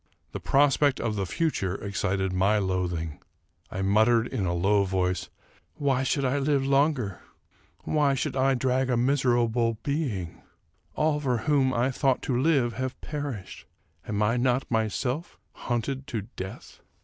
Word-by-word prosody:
The - - -5
prospect 140 0 +3
of 110 -2 -1
the 100 -2 -2
future 95 - -1
excited 100 -1 -2
my 95 +3 +3
loathing. 90 -5 -2 0.5
I 95 - -3
muttered, 110 +4 +4
in 110 -7 -2
a 85 - 0
low 100 +3 +3
voice, 90 -1 -1 0.2
" - - -32
Why 135 -3 +1
should 135 +1 0
I 135 +2 +1
live 140 -1 +1
longer? 135 - +1 0.6
Why 145 -3 +2
should 135 - -2
I 135 0 +3
drag 130 +1 +1
a 125 - +2
miser 125 0 +2
able 115 -1 +1
being? 125 - -3 0.5
All 155 -1 +1
for 130 -4 0
whom 140 -3 +3
I 130 +2 +1
ought 135 -2 +2
to 130 - -1
live 130 -3 +2
have 130 +3 -4
perished. 140 -10 -6 0.4
Am 105 0 0
I 115 +3 +2
not 125 +1 0
myself 125 - -1 0.2
hunted 130 +3 -3
to 115 -7 -3
death 95 +1 -8
125 Hz, 155 wpm, -27 LUFS, 100-135 Hz, 0.6 s, muttered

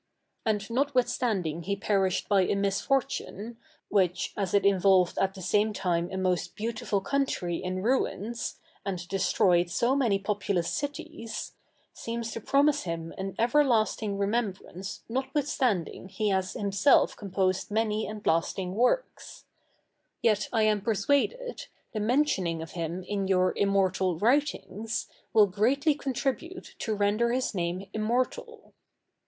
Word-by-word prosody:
And 210 -2 0
notwithstanding 240 - 0
he 200 +4 -2
perished 195 -2 0
by 200 -2 +4
a 185 - +1
misfortune, 225 +2 -1 0.3
which, 185 -3 +1
as 195 -2 -1
it 200 - +3
involved 190 -2 +4
at 195 0 +1
the 190 - -8
same 210 +4 +2
time 175 -3 0
a 190 - -4
most 180 -1 -1
beautiful 220 -2 -2
country 190 -8 -1
in 185 0 -3
ruins, 235 -2 -1 0.3
and 180 -3 -4
destroyed 180 -2 +2
so 240 +9 +1
many 235 -8 +2
populous 195 -3 -1
cities, 290 -5 -5 0.4
seems 230 0 -4
to 230 - -5
promise 285 +5 +3
him 165 -1 -4
an 190 0 -5
everlasting 230 -5 +2
remembrance 200 -3 -3
notwithstanding 255 - -1
he 205 +2 -1
has 190 -1 0
himself 200 +7 +3
composed 190 -2 -1
many 215 0 0
and 215 -1 -7
lasting 180 +3 0
works; 250 - -1 0.8
yet 215 -2 +2
I 225 -2 +2
am 215 -1 +2
persuaded, 285 - 0 0.3
the 215 - -2
mentioning 210 - +1
of 165 - -10
him 170 +1 -4
in 195 +1 -2
your 185 -1 +3
immortal 190 -3 +1
writings, 225 - 0 0.2
will 215 -2 +6
greatly 250 - +2
contribute 280 +6 -3
to 220 - -1
render 210 +3 +2
his 255 0 0
name 180 +1 -2
immortal. 235 +4 -2
205 Hz, 130 wpm, -28 LUFS, 190-240 Hz, 0.8 s, will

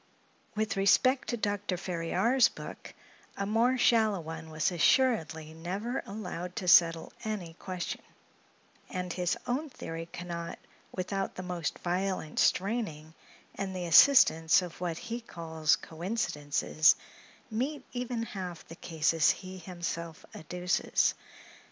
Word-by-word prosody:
With 215 -1 -1
respect 255 +7 +4
to 240 - -1
Dr. 205 -3 -1
Ferriar's 185 +9 +2
book, - - -10 0.4
a 200 - -1
more 230 +5 +2
shallow 220 -5 +3
one 160 0 -7
was 155 +3 0
assuredly 165 -5 +2
never 195 +10 -3
allowed 180 -3 -6
to 185 - -4
settle 165 -2 +5
any 200 -7 -4
question; 185 -2 -4 0.9
and 180 -1 -3
his 180 -1 0
own 265 +5 -1
theory 165 -9 -7
can 175 - -7
not, 170 -1 -5 0.3
without 195 +1 -3
the 185 - -5
most 175 -4 -3
violent 180 -3 -2
straining, 185 -7 0 0.4
and 195 -1 -4
the 180 -1 -3
assistance 165 - +6
of 175 0 -9
what 170 -2 -2
he 240 +2 -5
calls 160 -6 0
coincidences, 160 -4 +1 0.6
meet 265 +7 -2
even 245 -2 -2
half 185 -6 -6
the 165 - -10
cases 160 -3 +2
he 185 0 -3
himself 170 -2 -5
adduces. 180 +3 0
180 Hz, 125 wpm, -30 LUFS, 165-215 Hz, 0.9 s, assistance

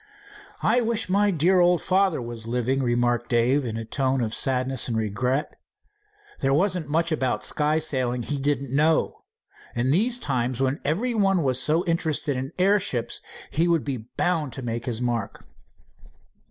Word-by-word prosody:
"I 240 +3 +3
wish 225 -3 -1
my 205 +2 +3
dear 180 +1 +3
old 175 -1 +4
father 190 -7 +1
was 115 -1 -7
living," 125 +3 0
remarked 120 -1 0
Dave 125 +4 +2
in 115 -3 -4
a 115 - -5
tone 135 +3 0
of 110 -1 -2
sadness 130 -1 0
and 115 -2 -1
regret. 125 +6 -1 0.8
"There 135 0 +2
wasn't 180 -2 0
much 165 +2 +1
about 130 -5 0
sky 150 +1 +1
sailing 130 -6 0
he 145 +3 -2
didn't 140 -1 -1
know. 155 +2 +1 0.5
In 120 +2 +1
these 230 - +2
times, 125 - -1
when 135 +2 0
everybody 195 - +1
is 130 -1 +2
so 160 +6 +1
interested 160 -4 0
in 130 +1 -4
airships, 185 - +1 0.3
he 165 +4 +1
would 170 -3 +2
be 125 -5 -5
bound 160 -7 0
to 130 - -6
make 120 0 -4
his 120 -1 -3
mark." 120 -4 -3
135 Hz, 160 wpm, -24 LUFS, 120-170 Hz, 0.8 s, old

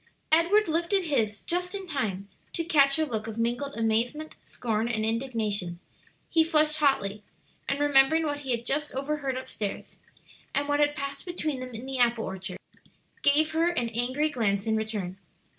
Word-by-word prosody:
Edward 350 +6 +4
lifted 340 +4 +1
his 225 - 0
just 360 +2 -2
in 390 -1 -5
time 210 - -2 0.3
to 335 - -1
catch 280 -5 +4
her 315 - +1
look 220 -6 -4
of 220 0 -6
mingled 240 +5 -1
amazement, 235 +7 0
scorn, 225 -1 -2
and 220 -2 -1
indignation. 220 -7 -1 0.5
He 325 -1 +4
flushed 310 -1 +3
hotly, 215 -9 +1 0.5
and 275 - 0
remembering 290 +2 +4
what 290 -1 -2
he 275 -2 -8
had 235 -1 -1
just 295 0 -1
overheard 275 -1 -2
up 260 - -6
stairs, 205 -2 -5 0.6
and 285 +1 +1
what 290 0 +1
had 295 0 +3
passed 280 +4 -5
between 310 -6 -2
them 255 -2 -7
in 230 +3 -7
the 265 -1 -4
apple 235 -2 +3
orchard, 190 -1 -5 0.6
gave 300 +2 +4
her 325 +2 +2
an 245 -9 -1
angry 255 +7 0
glance 205 -6 0
in 220 -1 +1
return. 210 -4 -3
270 Hz, 175 wpm, -27 LUFS, 225-305 Hz, 0.6 s, Edward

